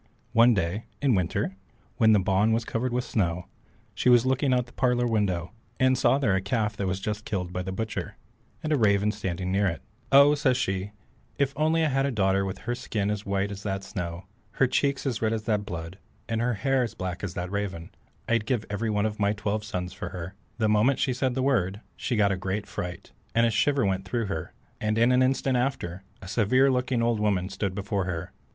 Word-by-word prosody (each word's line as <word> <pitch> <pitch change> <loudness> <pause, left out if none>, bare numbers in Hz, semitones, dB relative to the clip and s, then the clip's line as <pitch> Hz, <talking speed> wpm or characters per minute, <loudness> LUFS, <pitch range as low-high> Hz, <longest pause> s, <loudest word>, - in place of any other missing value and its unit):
One 115 +1 +6
day 95 +4 -1
in 140 -4 +3
winter, 95 +1 -1 0.4
when 110 -1 +5
the 105 - +6
bawn 100 +3 +2
was 115 +1 0
covered 120 +2 -2
with 125 +1 0
snow, 90 -7 -1 0.5
she - - +1
was 120 -1 +6
looking 130 +1 +2
out 125 -1 +3
of - - -8
the - - -18
parlour 125 -1 +2
window, 100 -7 0 0.3
and 130 -1 +4
saw 130 - +3
there 115 -9 +2
a 95 - +1
calf 105 +1 -1
that 100 - -1
was 95 +1 -1
just 105 +2 -3
killed 90 -5 -3
by 90 - -2
the 95 +1 -4
butcher, 110 +3 -4 0.5
and 155 0 0
a 145 - +2
raven 105 -1 +3
standing 95 -3 -3
near 100 +1 +2
it. 85 - -3 0.3
"Oh," 140 +2 +8
says 135 -4 +2
she, 95 -4 -1 0.5
"if 140 -1 0
I - - -10
had - - +5
only 160 +1 +3
a 135 -2 +2
daughter 100 -4 +1
with 95 - -4
her 120 - 0
skin 110 -5 -2
as 105 -1 -4
white 100 +1 0
as 100 0 -7
that 95 -1 -3
snow, 85 -1 -5 0.3
her 135 - +3
cheeks 140 +2 0
as 125 -5 -1
red 110 0 +1
as 110 -1 -2
that 105 -2 0
blood, 85 +2 -6 0.3
and 115 -1 -1
her 120 0 +1
hair 135 +6 +1
as 120 - -2
black 95 0 -4
as 95 -3 -4
that 90 +1 -4
raven, 100 -5 -3 0.4
I'd 115 -2 +1
give 120 -5 0
away - - -16
every 110 +2 -1
one 105 0 +1
of 110 -1 -3
my 100 0 +2
twelve 105 0 -2
sons 90 -4 -4
for 90 - -6
her." 90 0 -6 0.2
The 110 -2 +2
moment 110 +6 +3
she 130 - +1
said 125 0 -1
the 130 - 0
word, 105 -8 +1 0.2
she 125 - -2
got 105 -2 +3
a 95 - 0
great 95 +2 -3
fright, 90 -2 -6 0.2
and 115 0 +5
a 115 - +2
shiver 135 +3 +2
went 95 -1 -1
through 115 +4 -1
her, 95 -6 -4 0.3
and 110 0 0
in 115 +2 +4
an 125 0 +4
instant 130 0 +2
after, 95 -9 -2 0.2
a - - -8
severe 125 +7 +3
looking 125 -2 0
old 115 -2 +1
woman 100 -3 +1
stood 100 -3 -3
before 100 -1 -1
her. 85 -2 -4
105 Hz, 230 wpm, -27 LUFS, 95-125 Hz, 0.5 s, Oh